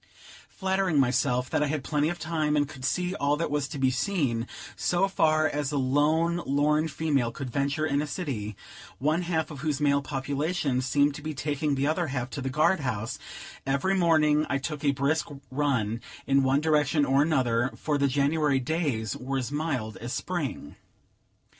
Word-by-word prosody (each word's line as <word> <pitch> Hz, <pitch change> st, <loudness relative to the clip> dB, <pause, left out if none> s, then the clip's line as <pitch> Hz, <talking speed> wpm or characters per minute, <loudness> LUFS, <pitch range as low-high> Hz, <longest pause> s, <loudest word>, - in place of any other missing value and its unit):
Flattering 190 Hz, -5 st, 0 dB
myself 125 Hz, -1 st, +2 dB
that 155 Hz, -, +1 dB
I 150 Hz, -, +2 dB
had 145 Hz, -1 st, -2 dB
plenty 150 Hz, +3 st, +1 dB
of 175 Hz, -, -3 dB
time, 155 Hz, -2 st, 0 dB
and 145 Hz, -1 st, +2 dB
could 130 Hz, -2 st, -11 dB
see 180 Hz, +6 st, 0 dB
all 145 Hz, -5 st, +1 dB
that 165 Hz, -1 st, -2 dB
was 145 Hz, -1 st, 0 dB
to 140 Hz, -, -6 dB
be 130 Hz, -1 st, +2 dB
seen, 125 Hz, -5 st, 0 dB, 0.3 s
so 180 Hz, +2 st, +1 dB
far 155 Hz, -4 st, +3 dB
as 145 Hz, -2 st, -2 dB
a 145 Hz, -, -1 dB
lone 155 Hz, +6 st, +2 dB
lorn 150 Hz, +3 st, +2 dB
female 145 Hz, -6 st, 0 dB
could 125 Hz, +1 st, -6 dB
venture 140 Hz, +4 st, 0 dB
in 140 Hz, -2 st, +1 dB
a 150 Hz, -, -3 dB
city, 130 Hz, -, -4 dB, 0.4 s
one 155 Hz, +5 st, +1 dB
half 165 Hz, -2 st, -1 dB
of 145 Hz, -, -8 dB
whose 150 Hz, -1 st, -1 dB
male 140 Hz, -1 st, +3 dB
population 140 Hz, +1 st, -1 dB
seemed 140 Hz, +3 st, +2 dB
to 150 Hz, -, -8 dB
be 155 Hz, 0 st, -5 dB
taking 145 Hz, +1 st, -1 dB
the 135 Hz, +1 st, 0 dB
other 160 Hz, +3 st, +1 dB
half 130 Hz, -2 st, -3 dB
to 140 Hz, -, -4 dB
the 135 Hz, -, -2 dB
guard 155 Hz, +7 st, +3 dB
house, 115 Hz, -5 st, -3 dB, 0.4 s
every 140 Hz, +8 st, +1 dB
morning 155 Hz, -4 st, +3 dB
I 140 Hz, -, +1 dB
took 145 Hz, +2 st, -5 dB
a 145 Hz, -, +3 dB
brisk 140 Hz, +3 st, +1 dB, 0.2 s
run 125 Hz, -6 st, 0 dB, 0.2 s
in 135 Hz, 0 st, +3 dB
one 135 Hz, +2 st, +2 dB
direction 150 Hz, -1 st, +2 dB
or 135 Hz, +1 st, +3 dB
another; 130 Hz, -5 st, +2 dB
for 150 Hz, -2 st, -1 dB
the 140 Hz, -, +3 dB
January 145 Hz, +1 st, +2 dB
days 130 Hz, -, -1 dB
were 135 Hz, +2 st, -3 dB
as 130 Hz, 0 st, -3 dB
mild 145 Hz, -8 st, -2 dB
as 120 Hz, +2 st, -5 dB
Spring. 145 Hz, -, -4 dB
145 Hz, 185 wpm, -27 LUFS, 135-155 Hz, 0.4 s, far